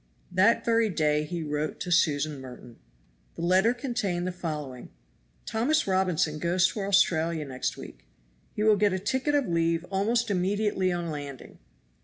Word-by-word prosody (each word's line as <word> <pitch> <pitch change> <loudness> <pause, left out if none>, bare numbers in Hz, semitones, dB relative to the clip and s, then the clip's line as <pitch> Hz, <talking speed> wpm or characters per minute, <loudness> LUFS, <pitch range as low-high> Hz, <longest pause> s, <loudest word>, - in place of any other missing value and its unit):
That 190 +6 +3
very 230 -1 +3
day 150 -3 +1
he 170 +1 -4
wrote 150 0 -3
to 180 - -4
Susan 150 -3 +2
Merton. 125 -2 -12 0.6
The 165 - -6
letter 185 +6 +4
contained 240 -9 -2
the 185 - -1
following: 150 -8 -6 0.6
"Thomas 245 +8 +1
Robinson 180 -5 +1
goes 175 +2 +2
to - - -6
Australia 170 -5 +2
next 130 -2 -3
week. - - -11 0.5
He 210 - -1
will 215 -1 +5
get 205 -1 +2
a - - 0
ticket 260 +9 0
of 285 -3 +1
leave 165 0 0
almost 225 +4 +1
immediately 195 0 0
on 175 -2 -3
landing. 145 -3 -8
180 Hz, 155 wpm, -27 LUFS, 155-205 Hz, 0.6 s, will